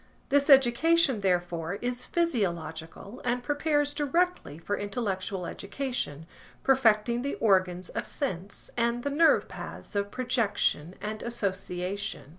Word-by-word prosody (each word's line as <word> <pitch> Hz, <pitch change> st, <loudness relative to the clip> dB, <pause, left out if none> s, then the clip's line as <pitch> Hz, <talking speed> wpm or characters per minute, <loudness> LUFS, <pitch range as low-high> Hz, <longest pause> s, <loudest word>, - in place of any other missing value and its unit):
This 285 Hz, +1 st, +3 dB
education, 270 Hz, 0 st, +5 dB
therefore, 175 Hz, -2 st, 0 dB
is 245 Hz, +3 st, -3 dB
physiological 195 Hz, -, -2 dB
and 245 Hz, 0 st, 0 dB
prepares 290 Hz, +1 st, +1 dB
directly 325 Hz, -, 0 dB
for 185 Hz, +5 st, -2 dB
intellectual 195 Hz, -3 st, -3 dB
education, 200 Hz, -, -4 dB, 0.4 s
perfecting 235 Hz, -3 st, +3 dB
the 280 Hz, +2 st, -2 dB
organs 185 Hz, -4 st, +2 dB
of -, -, -4 dB
sense, 195 Hz, -8 st, -3 dB
and 235 Hz, 0 st, 0 dB
the 285 Hz, -, -1 dB
nerve 320 Hz, +3 st, +4 dB
paths -, -, -9 dB
of 200 Hz, 0 st, 0 dB
projection 210 Hz, -, 0 dB
and 215 Hz, +1 st, -5 dB
association. 195 Hz, -, -3 dB
220 Hz, 115 wpm, -28 LUFS, 185-270 Hz, 0.4 s, education